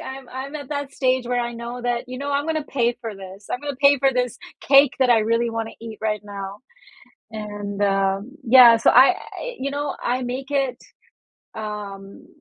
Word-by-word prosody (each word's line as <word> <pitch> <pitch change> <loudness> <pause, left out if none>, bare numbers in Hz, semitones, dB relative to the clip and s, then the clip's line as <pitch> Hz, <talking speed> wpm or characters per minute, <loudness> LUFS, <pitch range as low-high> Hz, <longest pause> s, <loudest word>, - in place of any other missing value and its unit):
I'm 265 -1 -8
I'm 270 +3 -7
at 285 -3 -9
that 285 -2 -4
stage 255 -2 0
where 245 0 0
I 240 0 -3
know 235 +1 -6
that, 245 0 -1
you 255 0 -6
know, 285 +1 -4
"I'm 285 +1 0
going 320 -1 -1
to 310 - -1
pay 240 -4 0
for 225 -3 -6
this, 195 +1 -11
I'm 250 - -2
going 290 -2 -4
pay 280 -1 +6
for 270 0 +3
this 250 -1 -1 0.2
cake 275 0 +5
that 255 -2 +4
I 225 -2 +5
really 230 +2 +1
wanna 225 0 -4
eat 225 -2 -8
right 210 -2 -1
now, 200 0 -7 0.7
and, 205 -2 -5
um" 195 +4 0
yeah, 240 -1 +8
so - - +4
I 265 +8 +7 0.4
you 275 +1 -3
know, 285 0 -3
I 250 +1 -1
make 255 +3 -5
it, 270 -3 0 0.8
um 205 -2 -7
245 Hz, 200 wpm, -22 LUFS, 215-270 Hz, 0.8 s, yeah